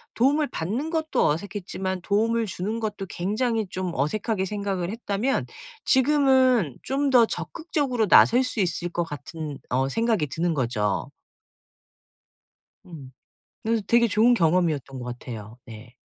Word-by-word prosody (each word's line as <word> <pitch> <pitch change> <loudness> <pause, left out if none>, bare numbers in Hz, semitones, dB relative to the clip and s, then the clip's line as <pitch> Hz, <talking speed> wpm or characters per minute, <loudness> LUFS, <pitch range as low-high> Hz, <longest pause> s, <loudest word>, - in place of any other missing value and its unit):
도움을 285 +5 +2
받는 225 - -3
것도 320 -1 +1
어색했지만 190 +2 -3
도움을 225 +3 +1
주는 205 +5 -3
것도 210 -3 -4
굉장히 215 +5 -1
좀 185 0 -3
어색하게 190 - -1
생각을 195 -3 -3
했다면 225 +3 -1 0.4
지금은 260 - +3
좀 275 +1 -1
더 245 -3 +6
적극적으로 280 -10 -2
나설 245 +6 +6
수 255 -3 -4
있을 175 -1 -1
것 175 0 -1
같은 150 -1 -7
어 130 +1 +1
생각이 225 -2 +1
드는 165 +5 -1
거죠. 115 -6 -1 1.8
음. 145 -7 -11 0.5
네. 225 0 +1
되게 235 0 +4
좋은 230 +3 +4
경험이었던 160 - +1
것 125 - -7
같아요. 110 -2 -9
네. 115 +2 -12
200 Hz, 280 characters per minute, -25 LUFS, 160-235 Hz, 1.8 s, 더